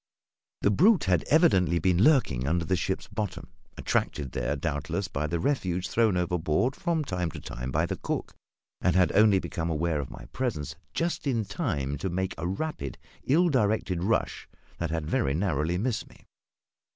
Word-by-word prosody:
The 100 - +4
brute 185 - +5
had 90 -4 +2
evidently 95 - +4
been 90 +3 +3
lurking 90 - +3
under 85 +2 +1
the 95 - +1
ship's 95 +1 -2
bottom 105 -5 -5 0.3
attracted 70 -4 -1
there, 75 - -1
doubtless, 75 0 -2
by 75 +2 -2
the 85 +2 -1
refuse 90 - 0
thrown 110 -5 +2
overboard 90 - 0
from 170 -3 0
time 90 -6 -2
to - - -8
time 60 +1 -6
by - - +1
the - - -3
cook - - -3 0.5
and 90 - +2
had 90 -1 +4
only 105 -1 +5
become 85 -3 -3
aware 80 -1 0
of 70 -3 -4
my - - -10
presence 75 - -2 0.2
just 170 -3 -1
in 115 -5 +1
time 70 - -2
to 95 - -2
make 95 +2 -2
a 85 - -2
rapid, 95 - -4 0.3
ill 170 +7 +4
directed 105 - +1
rush 110 +4 0 0.3
that 85 - -1
had 80 -1 -2
very 70 -2 0
narrowly 85 -1 0
missed 110 +1 -2
me. - - -20
90 Hz, 175 wpm, -28 LUFS, 80-110 Hz, 0.5 s, brute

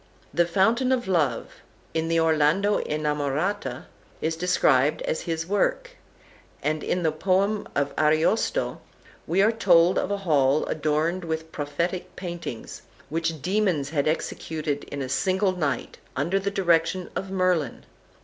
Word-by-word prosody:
The 175 0 +3
Fountain 225 +9 +2
of 250 -4 0
Love, 165 -8 0 0.4
in 160 0 0
the 165 0 +2
"Orlando 165 +6 +3
Innamorata," 150 +5 -2 0.3
is 160 0 -1
described 150 -5 +2
as 160 - -1
his 165 0 -1
work; - - 0 0.7
and 155 +1 -1
in 180 0 -1
the 160 - +2
poem 195 +6 +1
of 140 0 0
"Ariosto" 155 - +1 0.5
we 185 +5 +3
are 220 - +4
told 180 -5 +4
of - - -2
a 200 - 0
hall 145 -2 +3
adorned 155 +4 0
with 160 -1 -4
prophetic 170 +5 -3
paintings, 170 -10 -6 0.3
which 165 -2 -2
demons 180 -8 +1
had 145 -2 0
executed 155 -2 -2
in 140 -1 -5
a - - -4
single 190 +8 +1
night, 145 -8 -3 0.2
under 170 +9 +1
the 195 +1 -1
direction 175 -2 +1
of 190 - -3
Merlin. 185 -7 0
165 Hz, 140 wpm, -25 LUFS, 150-190 Hz, 0.7 s, are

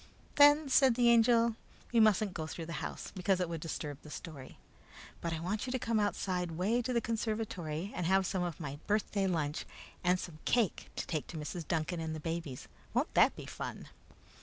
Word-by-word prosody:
"Then," 290 +1 +7
said 265 -2 +5
the 240 -1 +4
Angel, 230 0 +5 0.4
"we 235 - +5
mustn't 215 -2 +4
go 160 -3 -4
through 165 +1 -6
the 165 -1 -5
house, - - -5
because 190 0 +1
it 180 - 0
would 165 -2 -4
disturb 150 -3 -5
the 150 - -12
story; 145 -4 -9 0.6
but 170 - -2
I 165 - -2
want 205 +8 -2
you - - -2
to 260 - +1
come 230 -2 0
the 210 - +3
outside 180 -3 -1
way 205 +9 +1
to 245 - -3
the 240 - +3
conservatory 215 -7 -3
and 175 -2 -1
have 190 +1 +4
some 185 0 -1
of 175 -3 -3
my 145 -3 -5
birthday 205 -2 +1
lunch 155 -4 -1 0.4
and 180 0 +3
some 160 -4 -7
cake 235 -6 +1
to - - -3
take 155 -4 -3
to 165 - -7
Mrs. 155 +2 -5
Duncan 165 +1 -1
and 160 -1 -3
the - - -5
babies. 165 -4 -4 0.3
Won't - - +1
that - - +5
be - - -8
fun?" - - -6
180 Hz, 210 wpm, -33 LUFS, 160-220 Hz, 0.6 s, Then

